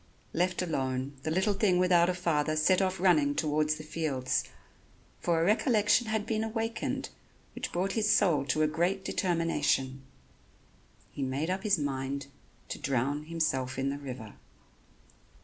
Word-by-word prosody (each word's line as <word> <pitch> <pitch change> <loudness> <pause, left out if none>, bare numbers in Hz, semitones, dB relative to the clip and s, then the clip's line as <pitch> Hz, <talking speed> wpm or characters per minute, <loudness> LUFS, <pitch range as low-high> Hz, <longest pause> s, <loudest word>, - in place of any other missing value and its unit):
Left 180 +1 0
alone, 135 -4 -2
the 155 - -3
little 190 +6 +2
thing 195 -2 +2
without 180 -1 +4
a 180 - 0
father 155 -4 0
set 180 +5 +3
off 190 -1 0
running 155 -6 +3
towards 155 0 +1
the 155 - -9
fields, 150 -5 -1 0.8
for 170 -2 +1
a 165 - +2
recollection 215 +2 +3
had 220 -1 -1
been 220 -1 -1
awakened 225 +1 -3 0.4
which - - -5
brought 185 +3 -1
his 215 -2 +1
soul 175 -10 +4
to 155 +3 +1
a - - +4
great 175 +5 0
determination. 150 -7 0 1.1
He - - -7
made 135 +6 -1
up 190 +1 -2
his 205 -2 +2
mind 140 -1 -3 0.4
to - - -5
drown 140 +3 -1
himself 145 -6 -1
in 135 +1 0
the 140 - -5
river. 125 -6 -8
160 Hz, 150 wpm, -30 LUFS, 140-185 Hz, 1.1 s, without